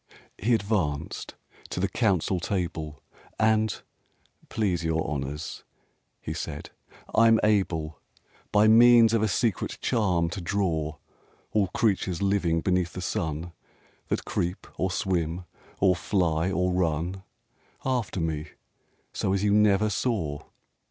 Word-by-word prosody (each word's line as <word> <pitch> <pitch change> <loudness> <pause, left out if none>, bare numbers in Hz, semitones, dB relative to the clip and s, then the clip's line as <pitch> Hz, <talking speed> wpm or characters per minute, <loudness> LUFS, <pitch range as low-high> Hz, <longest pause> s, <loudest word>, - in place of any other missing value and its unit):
VI 105 - -5
He 120 - +5
advanced 95 -9 -2 0.3
to - - -4
the 100 - +1
council 95 -4 +1
table: 85 -6 -3 0.3
And, 110 -2 +2 0.7
"Please 95 -6 0
your 80 -1 0
honors," 75 +1 -4 0.7
said - - -6 0.2
he, - - -24 0.2
"I'm 115 0 +5
able, 85 -8 +1 0.5
By 105 +1 +5
means 115 0 +7
of 115 - +3
a 110 - +2
secret 105 +1 -1
charm 95 -8 +1
to 95 - -5
draw 85 -5 -1 0.6
All 105 -3 +2
creatures 95 -3 0
living 95 -5 +1
beneath 90 -2 0
the 90 - -5
sun, 80 -1 -3 0.6
That - - -2
creep 90 +1 -2
or 95 +5 0
swim 90 -1 -1 0.3
or 95 -2 +4
fly 85 -2 0
or 90 -1 +1
run, 90 +1 -1 0.6
After 125 -7 -1
me 80 -2 -2 0.7
so 95 - 0
as 100 0 0
you 105 -1 +3
never 105 0 +4
saw! 85 - -1
95 Hz, 125 wpm, -27 LUFS, 80-105 Hz, 0.7 s, means